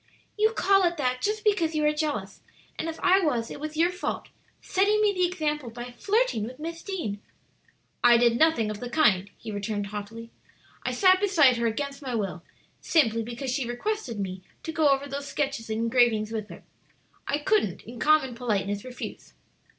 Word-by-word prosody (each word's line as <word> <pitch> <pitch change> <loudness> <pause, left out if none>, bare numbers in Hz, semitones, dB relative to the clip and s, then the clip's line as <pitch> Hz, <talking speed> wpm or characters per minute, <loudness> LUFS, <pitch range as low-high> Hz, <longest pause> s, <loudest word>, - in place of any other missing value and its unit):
"You 435 +1 +3
call 390 -3 +3
it 345 0 0
that 255 -3 -1
just 425 +1 -1
because 345 -7 +2
you 305 -1 +1
are 300 - +3
jealous. 290 -11 -3 0.4
And 330 - -2
if 325 - -7
I 375 +1 +5
was, 250 -10 0
it - - -7
was 310 +1 -6
your 340 +2 +3
fault 360 0 -4 0.3
setting 405 +3 +2
me 420 -1 +3
the 365 -1 +2
example 300 -7 -2
by 240 +2 -8
flirting 410 - +1
with 250 +4 -6
Miss 330 +2 -6
Deane." 225 - -4 0.8
"I 240 -1 +7
did 235 0 +3
nothing 310 -10 +3
of 210 - -6
the 245 - -5
kind," 205 -10 +3
he 225 - -7
returned 205 0 -3
haughtily. 215 +3 -7 0.5
"I - - -1
sat 370 -2 +5
beside 320 -11 +4
her 235 0 +1
against 280 +5 -3
my 255 -4 -3
will, 195 -5 -3 0.4
simply 230 -9 +2
because 240 +3 -4
she 260 -2 -2
requested 250 - -3
me 185 -1 -4 0.2
to 325 - -4
go 310 -2 +3
over 275 +1 +1
those 280 +1 -5
sketches 275 -7 -2
and 220 0 -2
engravings 230 -2 +2
with 215 -2 -4
her. - - -11 0.6
I 285 - +1
couldn't 295 - 0
in 235 +1 -10
common 305 -4 +3
politeness 205 -4 -2
refuse." 250 -1 -8
265 Hz, 190 wpm, -26 LUFS, 225-330 Hz, 0.8 s, I